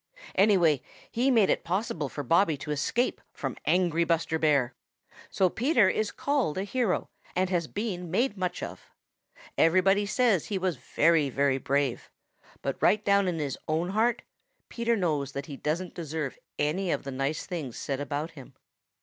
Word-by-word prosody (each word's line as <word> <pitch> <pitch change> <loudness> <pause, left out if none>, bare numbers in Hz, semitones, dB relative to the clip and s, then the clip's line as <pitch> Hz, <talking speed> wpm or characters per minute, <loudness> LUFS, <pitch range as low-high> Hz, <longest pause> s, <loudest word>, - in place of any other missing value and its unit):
Anyway, 185 - +4 0.3
he 250 +4 +2
made 225 -7 +4
it - - 0
possible 170 -5 -2
for 145 - -5
Bobby 165 +3 +3
to 145 +2 -6
escape 230 - 0
from - - -4
angry 175 -2 +2
Buster 165 -1 0
Bear. 140 -6 +2 0.6
So 190 - +2
Peter 240 - +3
is 215 +2 -1
called 280 - 0
a 190 - 0
hero 210 -1 -1 0.2
and 185 +1 +1
has 170 -3 0
been 185 -4 -4
made 215 +5 +1
much 180 -2 -3
of. - - -8 0.7
Everybody 195 +4 +4
says 220 -4 +3
that - - -11
he 205 - -1
was 185 -5 -1
very, 155 +4 +2
very 135 0 +1
brave. 140 -2 -1 0.5
But - - -3
right 210 0 +3
down 200 -1 +4
in 175 -2 -1
his 145 -4 -3
own 160 +3 0
heart, 225 +4 +1 0.5
Peter 235 0 0
knows 150 - -1
that 140 - -4
he 145 -4 -7
doesn't 165 +6 -2
deserve 155 -4 -4 0.2
any 175 +6 0
of 145 - 0
the 140 - -5
nice 135 +3 -2
things 150 -10 -5
said 135 -1 -3
about 145 +3 -3
him. 140 -6 -13
170 Hz, 170 wpm, -28 LUFS, 150-200 Hz, 0.7 s, Anyway